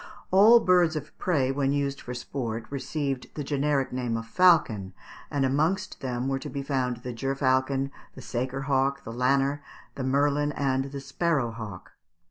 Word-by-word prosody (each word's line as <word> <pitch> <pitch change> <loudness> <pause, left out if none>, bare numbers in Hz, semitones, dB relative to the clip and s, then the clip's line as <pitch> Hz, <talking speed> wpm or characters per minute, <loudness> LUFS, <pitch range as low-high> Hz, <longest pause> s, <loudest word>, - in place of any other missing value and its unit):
All 210 +5 +8
birds 180 -5 +3
of 155 - -6
prey, 140 -8 +1
when 135 0 0
used 140 -1 -1
for 125 - -6
sport, 120 -3 -4
received 135 -1 -3
the 150 - -3
generic 140 -1 0
name 125 -3 -1
of 115 - -5
falcon; 115 - +3 0.3
and 140 -2 +1
amongst 155 +8 0
them 125 -1 -2
were 135 0 0
to - - -7
be 140 -1 -4
found 125 -3 -1
the 125 -2 -4
gerfalcon, 135 +1 0 0.2
the - - -9
saker 130 +2 -3
hawk, 140 0 0
the 115 - -7
lanner, 135 +3 +1 0.3
the 135 - -5
merlin, 145 +2 +1
and 135 -2 0
the 140 0 -6
sparrow 140 -2 0
hawk. 110 -5 -8
135 Hz, 165 wpm, -27 LUFS, 125-145 Hz, 0.3 s, All